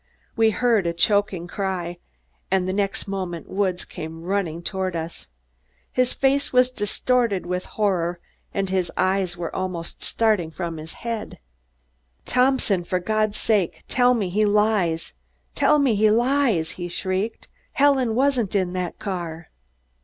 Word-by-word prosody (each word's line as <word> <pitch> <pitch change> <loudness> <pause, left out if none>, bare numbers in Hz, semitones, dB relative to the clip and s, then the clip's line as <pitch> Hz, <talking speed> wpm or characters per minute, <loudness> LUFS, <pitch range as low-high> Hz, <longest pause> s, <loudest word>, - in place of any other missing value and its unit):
We 225 -1 +4
heard 220 -4 +2
a 170 - 0
choking 200 0 +2
cry, 175 -2 -3 0.5
and 185 -1 +1
the 185 - -1
next 200 0 -1
moment 185 -4 -4
Woods 190 -2 0
came 160 +1 -8
running 175 -3 -2
toward 190 -1 -2
us. 165 - -5 0.6
His 255 0 +2
face 275 +1 +1
was 250 0 +4
distorted 230 -2 0
with 180 +1 -2
horror 180 -5 +1 0.3
and 195 -1 -1
his 185 -2 0
eyes 185 -1 +1
were 170 -1 -4
almost 180 -3 -4
starting 215 -7 +1
from 165 0 -5
his 155 +1 -8
head. 230 -2 -4 0.9
"Thompson, 250 -7 +2
for 180 +1 -1
God's 215 +3 0
sake, 205 -6 +1
tell 250 0 +4
me 205 -6 -1
he 210 +4 +2
lies! 205 -6 +2 0.4
Tell 300 - +4
me 275 -5 +3
he 215 +1 +4
lies!" 235 - +2
he 175 -1 -5
shrieked. 185 +5 -3 0.3
"Helen 270 -5 +3
wasn't 255 -6 +1
in 185 -2 +1
that 180 -2 -3
car?" 175 -4 -5
195 Hz, 145 wpm, -23 LUFS, 175-225 Hz, 0.9 s, We